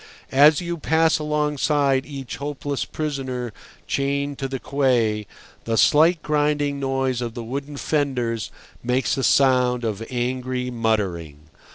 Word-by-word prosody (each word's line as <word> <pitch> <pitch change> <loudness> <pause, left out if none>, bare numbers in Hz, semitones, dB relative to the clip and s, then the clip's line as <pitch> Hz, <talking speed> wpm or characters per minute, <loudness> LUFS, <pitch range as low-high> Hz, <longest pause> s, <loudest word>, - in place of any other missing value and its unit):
As 145 +3 +6
you 170 -1 -4
pass 160 +2 +2
alongside 150 -2 +1
each 135 -4 -7
hopeless 145 0 -3
prisoner 130 -6 -4 0.3
chained 140 0 -1
to 135 - -2
the 135 0 -4
quay, 120 -7 +1 0.4
the 115 0 0
slight 160 +6 +4
grinding 145 -1 0
noise 135 -2 -1
of 120 -1 -4
the 120 - -5
wooden 140 +5 -5
fenders 125 - -1 0.3
makes 125 +2 0
a 135 - -2
sound 125 -3 +3
of 110 -1 -2
angry 125 0 -2
muttering. 90 -10 -2
135 Hz, 130 wpm, -23 LUFS, 120-145 Hz, 0.4 s, As